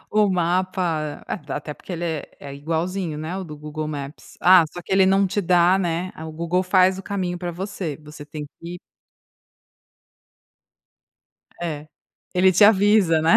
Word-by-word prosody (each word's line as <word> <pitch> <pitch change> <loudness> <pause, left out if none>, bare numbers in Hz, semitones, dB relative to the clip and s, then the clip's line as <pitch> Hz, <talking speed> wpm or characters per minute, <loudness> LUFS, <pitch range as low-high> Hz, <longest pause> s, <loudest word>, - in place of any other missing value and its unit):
o 210 -1 +3
mapa, 175 -3 -1
até 150 +1 -5
porque 185 - -10
ele 175 0 -3
é 160 -3 -2 0.2
é 140 -1 -8
igualzinho, 165 +3 -3
né, 160 +4 -4
o 190 - -4
do 155 -4 -9
Google 150 +1 -5
Maps, 145 0 -8
ah, 180 -2 +7
só 175 - -7
que 175 - -7
ele 190 0 +5
não 195 +1 +4
te 195 +2 -1
dá, 180 0 +4
né, 180 0 -2
o 160 - -6
Google 170 +3 -1
faz 185 0 +4
o 195 - -7
caminho 185 -3 -3
pra 175 0 -4
você 175 -3 -5
você 150 0 -11
tem 150 0 -7
que 175 +1 -7 2.8
É, 155 -3 -4 0.5
ele 185 +1 +5
te 205 - +6
avisa, 205 -5 +5
né, 165 +1 +6
175 Hz, 160 wpm, -22 LUFS, 155-185 Hz, 2.8 s, ah